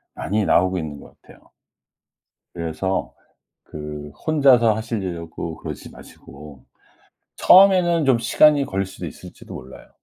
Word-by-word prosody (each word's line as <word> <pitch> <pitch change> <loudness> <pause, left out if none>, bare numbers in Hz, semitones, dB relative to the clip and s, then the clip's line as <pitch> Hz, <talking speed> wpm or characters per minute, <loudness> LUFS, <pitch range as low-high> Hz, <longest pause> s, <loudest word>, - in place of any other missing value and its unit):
많이 105 +1 -2
나오고 95 +1 +2
있는 75 -3 -7
것 - - -17
같아요. - - -20 1.1
그래서 85 +3 -3 0.5
그 75 -1 -8 0.2
혼자서 135 -8 +4
하시려고 90 -7 -5
그러지 - - -8
마시고 70 -1 -14 0.7
처음에는 180 -4 +5
좀 130 -3 +3
시간이 145 +4 +4
걸릴 95 -5 -3
수도 95 -2 -9
있을지도 75 - -12
몰라요. 65 0 -12
95 Hz, 280 characters per minute, -21 LUFS, 80-135 Hz, 1.1 s, 처음에는